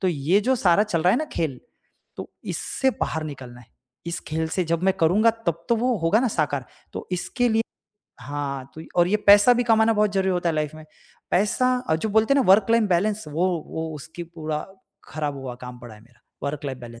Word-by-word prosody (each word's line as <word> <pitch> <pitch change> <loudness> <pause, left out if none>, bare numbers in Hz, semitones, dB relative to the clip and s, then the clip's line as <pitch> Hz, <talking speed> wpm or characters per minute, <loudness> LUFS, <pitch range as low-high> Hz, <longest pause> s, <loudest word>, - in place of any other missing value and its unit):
तो 190 - +1
ये 170 +5 +2
जो 260 +5 +2
सारा 185 -2 +4
चल 180 -7 -1
रहा 180 - +4
है - - +3
ना 310 - -1
खेल 150 -6 -2 0.6
तो - - -7
इससे 265 - -1
बाहर 160 -1 -1
निकलना 130 -5 -8
है। 115 - -20 0.4
इस 170 - -3
खेल 160 +1 -2
से 185 - 0
जब 170 +1 0
मैं 190 0 +3
करूँगा 195 +8 +4 0.2
तब 170 0 -1
तो 235 - +4
वो 245 +2 +1
होगा 165 +6 +2
ना 255 - +1
साकार। 145 - -1 0.3
तो - - -7
इसके 240 +7 0
लिए 225 0 +2 0.6
हाँ 140 0 -5
तो 160 - -8 0.2
और 175 - +4
ये 210 - +3
पैसा 205 +4 +8
भी 245 - +1
कमाना 225 -1 +4
बहुत 210 -1 +1
ज़रूरी 190 -1 +1
होता 175 -1 0
है 160 - 0
लाइफ 155 0 -2
में। 155 0 -11 0.5
पैसा 250 +7 +2
और 160 - +4
जो 220 - -2
बोलते 225 +6 +3
हैं 280 - +4
ना - - 0
वर्क 200 +2 +3
लाइन 230 -2 +4
बैलेंस 200 +3 +1
वो 165 +5 0 0.2
वो 160 0 -4
उसकी 160 +4 -8
पूरा 155 -2 -5 0.4
ख़राब 150 -2 -3
हुआ 130 -2 -6
काम 125 0 -9
पड़ा 120 -3 -11
है 105 - -16
मेरा 120 +2 -24 0.2
वर्क 145 +1 -4
लाइफ 130 -2 -4
बैलेंस 120 -1 -11
170 Hz, 225 wpm, -24 LUFS, 145-210 Hz, 0.6 s, पैसा